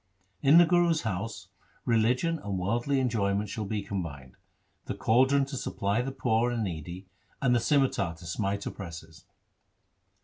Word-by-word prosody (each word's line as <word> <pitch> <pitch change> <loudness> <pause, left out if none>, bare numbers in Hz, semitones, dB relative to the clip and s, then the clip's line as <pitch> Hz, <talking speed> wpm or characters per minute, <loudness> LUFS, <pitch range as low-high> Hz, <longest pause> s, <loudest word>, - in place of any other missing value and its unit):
In 145 +4 +6
the 175 - +8
Guru's 170 -2 +2
house 110 0 -4 0.4
religion 125 +9 +2
and 100 -7 -4
worldly 120 +9 0
enjoyment 105 -5 0
shall 110 0 -4
be 105 0 -3
combined 75 -11 -6 0.3
— - - -44
the - - -3
caldron 130 +4 +3
to 135 0 -7
supply 100 -3 -1
the 135 +2 -3
poor 120 -2 +1
and 120 -2 -1
needy 90 +1 -6 0.3
and 125 -2 +2
the 120 - +4
scimitar 120 - +1
to 85 - -14
smite 100 +3 -2
oppressors.' 80 -2 -8
110 Hz, 150 wpm, -28 LUFS, 95-130 Hz, 0.4 s, the